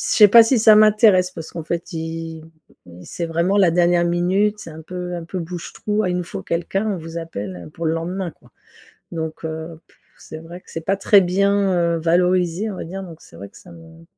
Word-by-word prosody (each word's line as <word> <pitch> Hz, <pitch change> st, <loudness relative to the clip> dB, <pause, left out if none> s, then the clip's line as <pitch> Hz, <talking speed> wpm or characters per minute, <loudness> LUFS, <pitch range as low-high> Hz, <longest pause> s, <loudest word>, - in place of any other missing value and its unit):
sais 210 Hz, -2 st, +5 dB
pas 230 Hz, +3 st, +9 dB
si 235 Hz, +2 st, +2 dB
ça 220 Hz, -1 st, +7 dB
m'intéresse 210 Hz, -4 st, +5 dB
parce 165 Hz, -3 st, -8 dB
qu'en 165 Hz, -2 st, -7 dB
fait 170 Hz, +2 st, -4 dB
ils 165 Hz, 0 st, -6 dB, 0.6 s
c'est 170 Hz, -, -5 dB
vraiment 170 Hz, +5 st, 0 dB
la 185 Hz, -4 st, +5 dB
dernière 175 Hz, 0 st, +2 dB
minute 190 Hz, +5 st, +1 dB
c'est 165 Hz, -, -9 dB
un 160 Hz, 0 st, -10 dB
peu 180 Hz, +1 st, -6 dB
un 170 Hz, -, -6 dB
peu 185 Hz, +3 st, -6 dB
bouche 175 Hz, 0 st, -7 dB
trou: 210 Hz, 0 st, -1 dB
«Ah 185 Hz, -, 0 dB
il 180 Hz, -, -1 dB
nous 180 Hz, -, -3 dB
faut -, -, -7 dB
quelqu'un», 195 Hz, +5 st, -2 dB
on -, -, -3 dB
vous 165 Hz, +1 st, -7 dB
appelle 100 Hz, -, -7 dB
pour 165 Hz, -, -6 dB
le 160 Hz, -, +1 dB
lendemain, 175 Hz, +2 st, -4 dB
quoi. -, -, -24 dB, 0.6 s
Donc, 160 Hz, -1 st, -5 dB
heu, 160 Hz, 0 st, -6 dB
pff, -, -, -28 dB, 0.2 s
c'est 155 Hz, -, -10 dB
vrai 170 Hz, +2 st, -10 dB
que -, -, -21 dB
c'est 165 Hz, -, -5 dB
pas 195 Hz, +3 st, 0 dB
très 200 Hz, 0 st, +5 dB
bien, 185 Hz, -2 st, +1 dB
heu, -, -, -1 dB
valorisé 180 Hz, +3 st, +1 dB
on -, -, -7 dB
va -, -, -5 dB
dire 190 Hz, +4 st, -7 dB
donc 165 Hz, -3 st, -12 dB
c'est -, -, -17 dB
vrai 100 Hz, -, -8 dB
que -, -, -18 dB
ça 180 Hz, -, -15 dB
me 165 Hz, 0 st, -15 dB
175 Hz, 230 wpm, -20 LUFS, 165-195 Hz, 0.6 s, pas